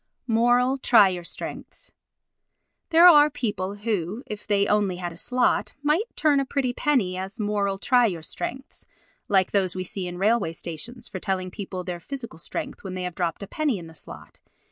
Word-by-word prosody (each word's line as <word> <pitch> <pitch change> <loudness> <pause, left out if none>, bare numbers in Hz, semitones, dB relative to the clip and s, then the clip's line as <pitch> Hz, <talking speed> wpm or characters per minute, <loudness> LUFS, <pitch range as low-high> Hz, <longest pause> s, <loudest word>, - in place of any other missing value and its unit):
Moral 245 +3 +3
Try 225 -7 +6
Your 180 -2 -4
Strengths - - -7 1.0
There 335 +2 +7
are 300 -4 +8
people 205 -7 -3
who, 205 +1 -2
if 210 -1 -8
they 200 -1 +3
only 205 -3 +1
had 175 -1 -4
a - - -11
slot, 250 +8 +1
might 320 +10 +1
turn 295 -3 +3
a - - +1
pretty 260 -2 -1
penny 245 -12 +1
as 190 +4 -6
moral 205 -2 0
try 245 +4 +4
your 170 -6 -4
strengths, 265 - -6 0.4
like 190 -2 +3
those 190 -3 +1
we 185 - -2
see 185 0 -4
in 175 0 -6
railway 200 -3 +2
stations 225 +10 -7
for 190 - -6
telling 185 -1 -2
people 185 -2 -6
their 175 -1 -5
physical 235 -4 -7
strength - - -6
when 190 -2 -6
they 185 - -3
have 180 -1 -3
dropped 175 +2 -2
a - - -7
penny 295 -4 0
in 170 - -8
the 160 - -12
slot. - - -9
205 Hz, 190 wpm, -25 LUFS, 185-245 Hz, 1.0 s, are